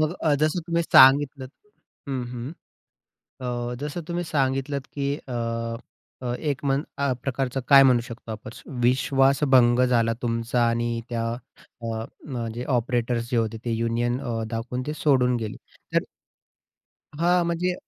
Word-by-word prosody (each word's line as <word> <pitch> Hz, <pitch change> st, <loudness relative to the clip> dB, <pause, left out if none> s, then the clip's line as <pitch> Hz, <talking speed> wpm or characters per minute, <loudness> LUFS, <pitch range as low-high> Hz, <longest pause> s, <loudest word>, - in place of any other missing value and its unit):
मग 155 Hz, +1 st, +1 dB
अ, 155 Hz, -2 st, +3 dB
जसं 155 Hz, +3 st, +2 dB
तुम्ही 170 Hz, -1 st, +1 dB
सांगितलत 135 Hz, -2 st, +5 dB, 0.6 s
हं, 130 Hz, -3 st, -2 dB
हं. 125 Hz, +4 st, -5 dB, 0.9 s
अ, 120 Hz, -1 st, -3 dB
जसं 150 Hz, +4 st, -4 dB
तुम्ही 175 Hz, 0 st, -2 dB
सांगितलत 135 Hz, -2 st, -1 dB
की 140 Hz, 0 st, -1 dB
अ, 135 Hz, -, -12 dB, 0.9 s
अ, 125 Hz, -1 st, -2 dB
एक 145 Hz, -4 st, -2 dB
मं 135 Hz, 0 st, +2 dB, 0.2 s
अ, 140 Hz, -1 st, +1 dB
प्रकारचं 135 Hz, 0 st, -2 dB
काय 140 Hz, -1 st, +9 dB
म्हणू 125 Hz, -3 st, +5 dB
शकतो 115 Hz, -1 st, -9 dB
आपण? 110 Hz, 0 st, -7 dB, 0.3 s
विश्वास 135 Hz, +3 st, +3 dB
भंग 120 Hz, -1 st, +6 dB
झाला 115 Hz, -2 st, +2 dB
तुमचा 115 Hz, 0 st, 0 dB
आणि 115 Hz, 0 st, -1 dB
त्या 115 Hz, -1 st, -2 dB, 0.6 s
अ, 115 Hz, -1 st, -3 dB, 0.2 s
न 125 Hz, -5 st, -4 dB
जे 120 Hz, +2 st, -5 dB
ऑपरेटर्स 120 Hz, 0 st, -1 dB
जे 120 Hz, -, +2 dB
होते 115 Hz, 0 st, 0 dB
ते, -, -, -1 dB
अ, -, -, +1 dB
युनियन 120 Hz, +2 st, 0 dB
अ, 115 Hz, -2 st, -3 dB
दाखवून 120 Hz, +2 st, -3 dB
ते 150 Hz, -, -2 dB
सोडून 125 Hz, -4 st, +4 dB
गेले. 110 Hz, -2 st, -5 dB, 0.4 s
तर -, -, +4 dB, 1.2 s
हां. 175 Hz, +1 st, +3 dB
म्हणजे 175 Hz, +2 st, 0 dB
125 Hz, 150 wpm, -25 LUFS, 120-140 Hz, 1.2 s, काय